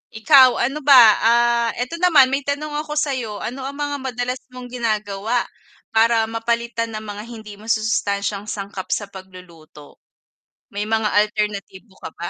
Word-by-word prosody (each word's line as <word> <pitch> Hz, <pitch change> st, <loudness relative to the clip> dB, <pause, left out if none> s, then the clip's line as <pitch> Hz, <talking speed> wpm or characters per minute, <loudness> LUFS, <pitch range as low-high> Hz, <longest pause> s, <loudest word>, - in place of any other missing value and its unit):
Ikaw, 260 Hz, +2 st, +6 dB
ano 275 Hz, +5 st, -1 dB
ba, 280 Hz, -1 st, +5 dB, 0.2 s
ah, 235 Hz, 0 st, +3 dB
eto 255 Hz, +8 st, -4 dB
naman 310 Hz, -7 st, +5 dB
may 275 Hz, -, +1 dB
tanong 285 Hz, +2 st, -4 dB
ako 300 Hz, 0 st, -5 dB
sa'yo. 260 Hz, -8 st, -2 dB
Ano 260 Hz, +2 st, -5 dB
ang 280 Hz, -, -7 dB
mga 290 Hz, 0 st, -3 dB
madalas 250 Hz, -1 st, -4 dB, 0.2 s
mong 250 Hz, -1 st, -9 dB
ginagawa 215 Hz, -1 st, -2 dB, 0.5 s
para 225 Hz, 0 st, +3 dB
mapalitan 230 Hz, 0 st, -2 dB
ang 215 Hz, -, -6 dB
mga 205 Hz, +2 st, -9 dB
hindi 215 Hz, -3 st, -11 dB
masusustansiyang 210 Hz, -2 st, -1 dB
sangkap 200 Hz, -2 st, -6 dB
sa 205 Hz, -2 st, -3 dB
pagluluto? 180 Hz, -6 st, -14 dB, 0.7 s
May 205 Hz, +1 st, -4 dB
mga 220 Hz, -1 st, 0 dB
alternatibo 210 Hz, -1 st, -2 dB
ka -, -, -8 dB
ba? 170 Hz, -, -4 dB
230 Hz, 145 wpm, -20 LUFS, 205-255 Hz, 0.7 s, Ikaw